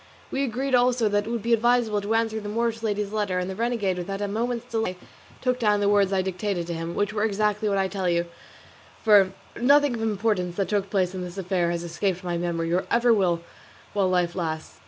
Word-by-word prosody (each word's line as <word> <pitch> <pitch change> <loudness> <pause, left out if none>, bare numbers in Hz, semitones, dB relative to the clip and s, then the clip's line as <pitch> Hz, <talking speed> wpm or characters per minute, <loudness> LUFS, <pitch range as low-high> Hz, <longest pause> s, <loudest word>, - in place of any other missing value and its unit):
We 270 - 0
agreed 265 +1 -2
also 245 -2 +3
that 205 +1 0
it - - -3
would 235 -2 -2
be 235 0 +2
advisable 230 -2 +2
to 210 +3 -1
answer 225 -1 0
the 205 -1 -6
Moorish 230 +1 -1
lady's 210 -2 -1
letter, 205 -4 0
and 180 0 -1
the 190 - -5
renegade 215 -5 -1
without 195 +3 -4
a 205 - -1
moment's 235 +3 -2
delay 225 -6 -2 0.4
took 250 -1 0
down 210 -3 +3
the 205 - +1
words 200 -1 +3
I 190 -1 +1
dictated 185 -1 -2
to 170 - -4
him, 165 +1 -4
which 205 0 0
were 210 -1 0
exactly 210 0 +1
what 200 - +1
I 195 - +2
shall 190 - -3
tell 190 -3 -1
you, 170 0 +1 0.8
for 205 -4 +6 0.3
nothing 285 +1 +5
of 230 - -4
importance 205 -5 0
that 195 -2 -1
took 200 -1 0
place 185 -2 +1
in 185 - -4
this 180 +1 -7
affair 180 -2 0
has 170 0 -2
escaped 180 +2 -2
my 175 -1 -2
memory, 170 -1 -1
or 180 - +1
ever 235 0 +4
will 180 -5 +1 0.5
while 195 -2 +2
life 180 -2 +1
lasts. 160 - -4
205 Hz, 230 wpm, -25 LUFS, 180-225 Hz, 0.8 s, for